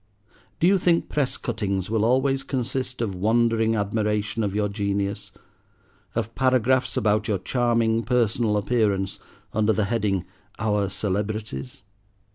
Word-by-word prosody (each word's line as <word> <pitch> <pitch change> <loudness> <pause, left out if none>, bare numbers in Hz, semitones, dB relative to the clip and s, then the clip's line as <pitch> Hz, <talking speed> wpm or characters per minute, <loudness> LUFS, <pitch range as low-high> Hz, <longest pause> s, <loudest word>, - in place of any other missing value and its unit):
Do - - +2
you 190 +1 +5
think 170 -2 +2
press 145 -4 0
cuttings 100 -4 -2
will 110 -2 +1
always 135 +3 +2
consist 130 -1 -3
of 110 -4 -1
wondering 115 +3 +2
admiration 105 +1 -1
of 100 -1 -2
your 105 -1 +1
genius, 100 -1 -2 0.8
of 115 0 -2
paragraphs 130 0 +2
about 105 0 +2
your 105 - +1
charming 115 +2 +1
personal 115 -3 +1
appearance 105 -3 0 0.3
under 110 0 +2
the 105 0 +1
heading, 100 -4 0 0.3
'Our 105 -2 0
Celebrities'? 100 - -3
110 Hz, 125 wpm, -24 LUFS, 100-120 Hz, 0.8 s, you